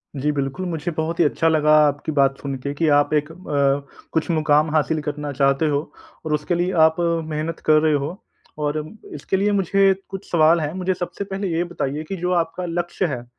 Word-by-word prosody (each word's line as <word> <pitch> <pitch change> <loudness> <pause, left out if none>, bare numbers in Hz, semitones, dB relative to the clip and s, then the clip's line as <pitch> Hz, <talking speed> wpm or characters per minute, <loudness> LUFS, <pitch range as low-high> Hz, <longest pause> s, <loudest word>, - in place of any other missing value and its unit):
जी, 145 +2 0
बिल्कुल 140 +6 -3
मुझे 165 0 -3
बहुत 160 +1 -2
ही 170 - +6
अच्छा 160 +2 +1
लगा 155 -1 +3
आपकी 145 +2 -1
बात 135 0 +3
सुन 140 -1 -3
के 140 0 -2
कि 160 +2 0
आप 145 +1 +1
एक 150 +2 0
अ, - - -12 0.8
कुछ 160 +1 -1
मुक़ाम 155 -1 +3
हासिल 155 0 +1
करना 150 0 -4
चाहते 140 +3 +2
हो 145 -1 +1 0.5
और 155 - -1
उसके 150 +4 0
लिए 175 +2 0
आप 160 0 +2 0.3
मेहनत 155 +2 -3
कर 155 0 +5
रहे 155 -1 +3
हो 150 - -3 0.5
और 145 +1 0 0.4
इसके 150 +6 -2
लिए 205 +2 +1
मुझे 195 0 +3 0.2
कुछ 195 0 -8
सवाल 165 0 +5
हैं। 150 0 -2
मुझे 185 0 -1
सबसे 180 +3 -5
पहले 195 0 -4
ये 170 - +1
बताइए 145 -1 -3
कि 195 - -2
जो 180 +1 -2
आपका 165 +2 -5
लक्ष्य 175 +2 -2
है - - -3
अ, - - -16
155 Hz, 210 wpm, -22 LUFS, 150-175 Hz, 0.8 s, ही